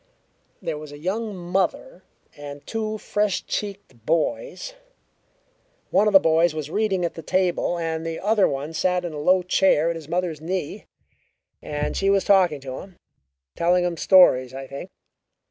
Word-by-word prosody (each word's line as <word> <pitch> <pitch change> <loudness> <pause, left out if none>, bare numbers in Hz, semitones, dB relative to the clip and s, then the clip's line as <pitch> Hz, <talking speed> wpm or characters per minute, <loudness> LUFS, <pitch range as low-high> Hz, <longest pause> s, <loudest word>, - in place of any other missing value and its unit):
There 150 - -3
was 150 -1 -10
a 145 - -9
young 205 +7 -3
mother 190 - -2 0.3
and 145 -1 -9
two 215 -1 -3
fresh 210 -2 -1
cheeked 200 - -5
boys; 295 - -1 1.2
one 210 - +4
of 210 - +2
the 195 - +10
boys 165 0 +3
was 155 -1 -5
reading 195 -4 0
at 170 - -3
the 165 - -8
table, 180 -1 0
and 160 -1 -3
the 165 0 -4
other 210 0 +3
one 140 +4 -4
sat 180 +2 0
in 170 - -5
a 150 - -5
low 180 +4 +3
chair 175 -3 +3
at - - -4
his 160 -2 -9
mother's 170 -3 -2
knee 180 -2 -4 0.8
and 150 0 -3
she 195 - +1
was 195 -1 +3
talking 180 -7 +4
to 130 -1 -6
him 190 -2 -13 0.6
telling 175 +1 +2
him 175 -1 -1
stories, 135 -8 +5
I 135 0 -6
think. 140 +7 -8
175 Hz, 165 wpm, -23 LUFS, 155-195 Hz, 1.2 s, the